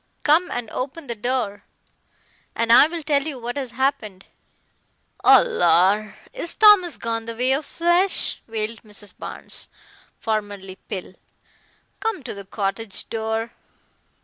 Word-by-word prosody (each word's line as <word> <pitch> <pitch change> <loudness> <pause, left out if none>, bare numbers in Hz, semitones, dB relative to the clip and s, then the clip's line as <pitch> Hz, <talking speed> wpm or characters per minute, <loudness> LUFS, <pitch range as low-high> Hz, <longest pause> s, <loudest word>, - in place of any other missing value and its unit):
"Come 320 +5 +4
and 240 -2 -4
open 280 +5 -5
the 240 - -3
door, 230 -2 -2 0.9
and 230 0 +3
I'll 320 +6 +5
tell 290 -2 +2
you 290 -2 -5
what 240 +1 -5
has 270 -3 -3
happened." 235 -6 -2 1.0
"Oh, - - +8
lor! 195 - +3 0.2
is 420 -9 -3
Thomas 405 - +6
gone 225 -1 -3
the 230 0 -5
way 250 +3 +1
of 275 +3 0
flesh?" 345 +3 +1
wailed 225 0 -4
Mrs. 205 -2 -12
Barnes, - - -8 0.5
formerly 205 -3 -3
Pill. 185 -1 -6 0.9
"Come 445 -9 -2
to 245 - -5
the 200 -1 -9
cottage 200 +1 -3
door." 225 0 -2
230 Hz, 130 wpm, -22 LUFS, 210-290 Hz, 1.0 s, Oh